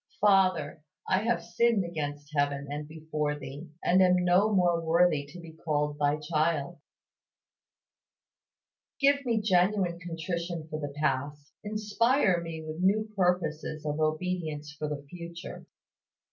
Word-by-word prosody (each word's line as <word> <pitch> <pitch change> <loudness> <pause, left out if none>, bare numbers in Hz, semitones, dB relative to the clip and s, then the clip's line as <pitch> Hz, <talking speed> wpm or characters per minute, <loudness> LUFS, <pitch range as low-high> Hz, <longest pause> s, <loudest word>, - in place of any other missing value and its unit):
Father, 185 -7 +3 0.3
I 185 - +3
have 235 0 +1
sinned 230 -5 +2
against 145 -3 -5
heaven 145 -1 0
and 150 +1 -4
before 155 -1 -3
Thee, 140 +4 -8
and 185 +2 +4
am 180 -1 +5
no 180 +4 +3
more 175 -4 +2
worthy 165 -3 +3
to 155 +5 -11
be 165 -1 -10
called 150 -2 -2
Thy 145 0 +2
child! 155 +1 -1 2.2
Give 280 0 +4
me 230 -2 +2
genuine 185 -3 +2
contrition 170 -1 -4
for 155 - -3
the 145 -2 -5
past, 145 0 -2
inspire 215 -1 +2
me 165 -1 -6
with 155 +2 -5
new 215 +4 +2
purposes 165 -5 0
of 150 +1 -2
obedience 155 -2 -2
for 150 0 -4
the 145 -1 -5
future. 170 +2 -9
165 Hz, 130 wpm, -29 LUFS, 150-185 Hz, 2.2 s, am